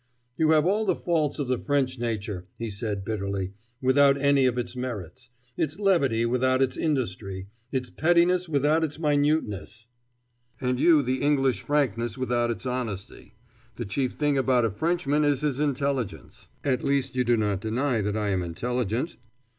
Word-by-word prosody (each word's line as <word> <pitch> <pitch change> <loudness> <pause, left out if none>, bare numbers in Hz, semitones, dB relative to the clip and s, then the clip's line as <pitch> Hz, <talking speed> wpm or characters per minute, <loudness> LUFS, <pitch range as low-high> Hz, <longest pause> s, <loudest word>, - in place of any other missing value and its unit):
"You 155 +1 +2
have 155 -1 +4
all 210 +4 +1
the - - +3
faults 160 -5 0
of 145 -4 -2
the 125 -1 0
French 135 -3 0
nature," 105 -6 -3
he 115 -2 -4
said 100 -1 -4
bitterly, 100 -3 -3 0.3
"without 140 +1 +5
any 140 -1 +4
of 125 -1 0
its 120 0 -3
merits: 120 -1 -6 0.3
its 155 +2 -1
levity 140 - +2
without 130 +2 +2
its 135 -1 +1
industry, 100 - -2 0.2
its 130 -2 -2
pettiness 175 +2 +3
without 150 +2 +2
its 150 -2 -2
minuteness 145 - 0 0.4
" 120 0 -42
"And 125 -1 -1
you 155 -1 +5
the 130 +1 -1
English 135 -7 +2
frankness 120 -6 0
without 120 -2 0
its 115 +1 -4
honesty. 120 -6 -5 0.4
The - - -4
chief 125 +6 -1
thing 145 -2 +1
about 125 -2 +3
a 110 - 0
Frenchman 150 - 0
is 145 -2 +2
his 145 -3 -1
intelligence. 135 - -2 0.2
At 130 -3 0
least 135 -2 0
you 125 - +2
do 120 -1 +2
not 105 -3 0
deny 120 +2 0
that 105 +1 -1
I 105 -1 -1
am 95 -2 0
intelligent?" 120 - -2
130 Hz, 170 wpm, -26 LUFS, 110-145 Hz, 0.4 s, without